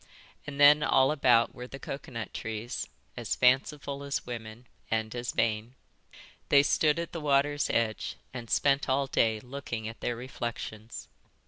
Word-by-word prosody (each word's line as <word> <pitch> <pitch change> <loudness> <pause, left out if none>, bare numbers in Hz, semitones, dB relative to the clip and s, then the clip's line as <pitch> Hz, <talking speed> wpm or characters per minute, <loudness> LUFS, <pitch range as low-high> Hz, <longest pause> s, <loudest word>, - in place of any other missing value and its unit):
And 140 -1 -6
then 145 +1 +8
all 135 0 +4
about 125 -6 +4
were 125 0 -8
the 135 - -8
coconut 130 -5 -6
trees, 110 +1 -4 0.3
as - - -2
fanciful 140 +2 +2
as 140 0 -3
women, 115 0 -7 0.2
and 110 -1 -1
as 120 -1 -3
vain. 115 +2 0 0.7
They 140 -1 +7
stood 150 +1 +3
at 170 0 -3
the 165 - -5
water's 145 0 +2
edge 110 -2 0 0.2
and 120 -3 -7
spent 140 -1 +2
all 135 +1 +2
day 110 -4 +1
looking 125 -3 -5
at 115 - -8
their 120 - -2
reflections. 120 -2 -6
125 Hz, 150 wpm, -29 LUFS, 115-140 Hz, 0.7 s, then